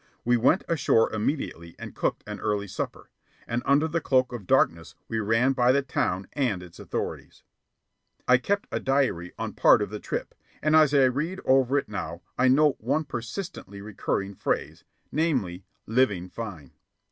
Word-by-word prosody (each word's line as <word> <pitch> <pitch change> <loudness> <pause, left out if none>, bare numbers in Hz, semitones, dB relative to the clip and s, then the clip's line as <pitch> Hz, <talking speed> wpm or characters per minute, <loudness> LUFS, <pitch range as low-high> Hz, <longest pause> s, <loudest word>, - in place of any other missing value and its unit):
We 120 +1 +4
went 125 - +3
ashore 130 -8 +2
immediately 105 - -3
and - - -8
cooked - - -1
an - - -6
early 105 -1 -1
supper; 95 - -6 0.3
and 120 +1 -2
under 145 +3 +4
the 165 +1 -1
cloak 130 -3 +2
of 105 -7 -7
darkness 85 +1 +2
we 115 - -2
ran 115 +5 +2
by 125 -1 +4
the 140 +1 +2
town 95 -7 -1
and 120 -11 -1
its 85 -2 -13
authorities. - - -5 0.8
I 125 0 +6
kept 200 +9 -1
a - - -1
diary 130 -11 0
on - - -4
part - - +5
of - - -3
the - - -5
trip, - - -4 0.3
and 155 +1 +2
as 155 -3 +6
I 140 -2 +5
read 145 +9 0
it - - -10
over 135 +1 +3
now 85 -5 -5
I 130 - +3
note 145 +2 +4
one 135 +8 0
persistently 120 - -6
recurring 100 -1 -3
phrase, - - -2 0.3
namely, 125 - -1 0.2
"Living 105 -7 +1
fine." 90 - -7
125 Hz, 170 wpm, -26 LUFS, 100-140 Hz, 0.8 s, I